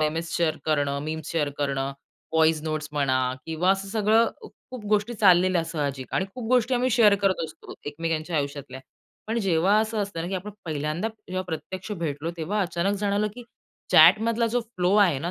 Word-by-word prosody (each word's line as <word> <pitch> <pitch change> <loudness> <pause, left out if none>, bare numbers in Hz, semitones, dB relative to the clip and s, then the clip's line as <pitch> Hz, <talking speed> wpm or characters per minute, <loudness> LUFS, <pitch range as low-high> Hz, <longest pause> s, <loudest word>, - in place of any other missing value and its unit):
Memes 160 +2 -2
share 160 -2 +1
करणं, 145 -2 +1
memes 160 0 -5
share 150 -3 0
करणं, 140 -1 -1 0.4
voice 160 -1 +3
notes 155 -1 -3
म्हणा 135 -3 +1 0.3
किंवा 165 +4 +1
असं 195 0 0
सगळं 220 +2 +3 0.4
खूप 250 -5 -8
गोष्टी 210 +3 +1
चाललेल्या 185 -4 +4
साहजिक 140 -6 -4
आणि 190 - +1
खूप 240 -3 -6
गोष्टी 250 0 +3
आम्ही 250 +1 +1
शेअर 215 -3 +5
करत 185 -4 +2
असतो 155 - -10
एकमेकांच्या 160 +2 -2
आयुष्यातल्या. 140 -2 -4 0.5
पण 225 +2 -1
जेव्हा 195 +1 +3
असं 220 0 -2
असतं 195 -5 -5
ना 175 - -4
की 195 - -3
आपण 190 +3 -4
पहिल्यांदा 155 +6 -2
जेव्हा 185 -4 -6
प्रत्यक्ष 185 +4 -6
भेटलो, 160 0 -3
तेव्हा 190 +6 -2
अचानक 180 +3 -1
जाणवलं 205 +1 0
की 245 - -9 0.5
चॅट - - +8
मधला 230 +1 +1
जो 240 +2 0
फ्लो 200 -5 -1
आहे 180 -9 +4
ना, 170 +5 -3
175 Hz, 180 wpm, -25 LUFS, 155-210 Hz, 0.5 s, चॅट